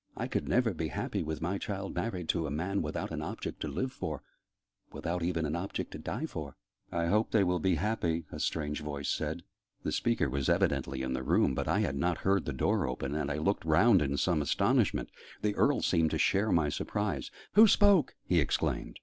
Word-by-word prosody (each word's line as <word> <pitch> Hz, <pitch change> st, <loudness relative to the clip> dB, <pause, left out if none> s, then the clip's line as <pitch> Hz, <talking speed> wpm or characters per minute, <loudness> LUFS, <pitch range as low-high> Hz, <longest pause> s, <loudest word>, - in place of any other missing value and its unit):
I -, -, -2 dB
could -, -, -2 dB
never 120 Hz, -4 st, +2 dB
be 80 Hz, -1 st, -2 dB
happy -, -, -3 dB
with 80 Hz, 0 st, -4 dB
my 95 Hz, +3 st, -1 dB
child 100 Hz, -2 st, -4 dB
married 90 Hz, -7 st, -3 dB
to 80 Hz, -, +1 dB
a -, -, -4 dB
man 90 Hz, +7 st, -1 dB
without 75 Hz, 0 st, -3 dB
an -, -, -3 dB
object -, -, -5 dB
to -, -, -3 dB
live 130 Hz, 0 st, -2 dB
for 75 Hz, -4 st, -5 dB, 0.7 s
without 85 Hz, +1 st, -3 dB
even 85 Hz, -1 st, 0 dB
an 75 Hz, +1 st, -2 dB
object 95 Hz, +3 st, -4 dB
to -, -, -7 dB
die -, -, -3 dB
for!" -, -, -6 dB, 0.4 s
"I 85 Hz, -1 st, 0 dB
hope 105 Hz, +6 st, +2 dB
they 110 Hz, -3 st, +3 dB
will 90 Hz, -1 st, +1 dB
be 90 Hz, +2 st, +2 dB
happy," 85 Hz, -3 st, -1 dB
a -, -, -6 dB
strange 75 Hz, -2 st, -2 dB
voice 75 Hz, -1 st, -4 dB
said. 80 Hz, +3 st, -2 dB, 0.4 s
The -, -, -1 dB
speaker 115 Hz, -8 st, +1 dB
was 70 Hz, 0 st, -1 dB
evidently 65 Hz, -1 st, +1 dB
in 65 Hz, 0 st, -2 dB
the 65 Hz, -, -2 dB
room, 65 Hz, -, +2 dB
but -, -, -2 dB
I -, -, +2 dB
had 70 Hz, -, -1 dB
not 85 Hz, +3 st, +1 dB
heard 95 Hz, -1 st, +2 dB
the 75 Hz, -, -2 dB
door 65 Hz, -, +1 dB
open, 65 Hz, +2 st, -3 dB
and 75 Hz, -, -1 dB
I 75 Hz, -, -2 dB
looked 95 Hz, +7 st, 0 dB
round 95 Hz, +5 st, +5 dB
in 70 Hz, -1 st, 0 dB
some 85 Hz, -2 st, +2 dB
astonishment. 70 Hz, -, +1 dB, 0.3 s
The 105 Hz, -1 st, +2 dB
Earl 140 Hz, +6 st, +2 dB
seemed 80 Hz, -3 st, +3 dB
to -, -, -1 dB
share 105 Hz, +3 st, +2 dB
my 80 Hz, -3 st, +3 dB
surprise. 95 Hz, -3 st, -2 dB, 0.2 s
"Who 220 Hz, +2 st, +9 dB
spoke?" 200 Hz, -7 st, +4 dB
he -, -, +3 dB
exclaimed. -, -, -1 dB
85 Hz, 215 wpm, -31 LUFS, 75-100 Hz, 0.7 s, Who